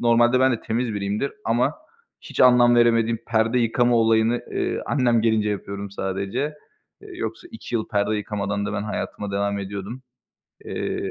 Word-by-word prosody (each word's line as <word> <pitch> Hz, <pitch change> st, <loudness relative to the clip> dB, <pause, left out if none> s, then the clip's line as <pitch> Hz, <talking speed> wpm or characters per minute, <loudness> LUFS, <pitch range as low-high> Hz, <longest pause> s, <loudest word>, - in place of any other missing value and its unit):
normalde 120 Hz, +1 st, +4 dB
ben 130 Hz, 0 st, +4 dB
de 115 Hz, -, -2 dB
temiz 115 Hz, 0 st, -2 dB
biriyimdir 100 Hz, +6 st, -2 dB
ama 120 Hz, +2 st, +1 dB, 0.5 s
hiç -, -, -6 dB
anlam 125 Hz, -1 st, +6 dB
veremediğim 115 Hz, -1 st, +3 dB
perde 115 Hz, +2 st, +2 dB
yıkama 120 Hz, +1 st, +2 dB
olayını, 115 Hz, +1 st, +3 dB
eee, -, -, -1 dB
annem 120 Hz, -5 st, +2 dB
gelince 110 Hz, -2 st, +2 dB
yapıyorum 100 Hz, 0 st, -5 dB
sadece. 100 Hz, +9 st, -3 dB, 0.5 s
Eee, 415 Hz, -, -13 dB
yoksa 355 Hz, 0 st, -5 dB
2 225 Hz, -, -8 dB
yıl 110 Hz, -2 st, -1 dB
perde 105 Hz, +1 st, 0 dB
yıkamadan 100 Hz, -1 st, -3 dB
da 105 Hz, -, -3 dB
ben 105 Hz, -1 st, -2 dB
hayatıma 105 Hz, -1 st, -4 dB
devam 100 Hz, 0 st, -1 dB
ediyordum. 100 Hz, +5 st, -6 dB, 0.6 s
Eee, -, -, -3 dB
ve 95 Hz, -, -3 dB
115 Hz, 160 wpm, -23 LUFS, 100-120 Hz, 0.6 s, anlam